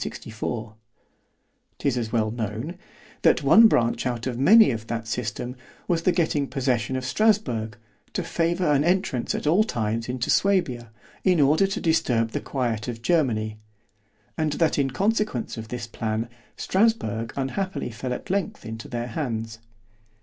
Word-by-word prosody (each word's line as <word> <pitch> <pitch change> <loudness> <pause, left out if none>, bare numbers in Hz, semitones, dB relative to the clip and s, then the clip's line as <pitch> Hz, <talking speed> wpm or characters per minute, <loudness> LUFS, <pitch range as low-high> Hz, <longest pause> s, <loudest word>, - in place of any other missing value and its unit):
'Tis 140 -3 0
as 115 -3 -2
well 110 -2 +1
known, 115 - -4 0.5
that - - +4
one 225 +1 +8
branch 120 - +1
out 120 -2 -3
of 130 -2 -2
many 215 +9 +7
of 115 -1 -5
that 115 -1 -4
system, 120 +2 -3 0.3
was 170 -2 +1
the 180 - +3
getting 160 -5 0
possession 130 -2 -1
of 130 0 -3
Strasburg, 130 - +1 0.4
to - - -1
favour 170 -1 0
an 145 0 +3
entrance 175 - 0
at - - -4
all 175 +8 +4
times 115 - -2
into 125 -1 -1
Suabia, 170 - +1 0.3
in 180 -3 +3
order 150 +7 +4
to 195 - -3
disturb 120 -9 +1
the - - -3
quiet 120 -6 -2
of 115 -1 -6
Germany——and 110 - -3
that 160 -1 +1
in 135 -1 +2
consequence 205 - -1
of 110 -1 -7
this 125 0 -5
plan, 115 0 -3 0.3
Strasburg 115 - +1
unhappily 185 +4 -2
fell 125 +3 -5
at 125 - -4
length 200 +2 -2
into 110 0 -7
their 120 0 -4
hands. 115 -4 -4
125 Hz, 150 wpm, -25 LUFS, 115-170 Hz, 0.5 s, one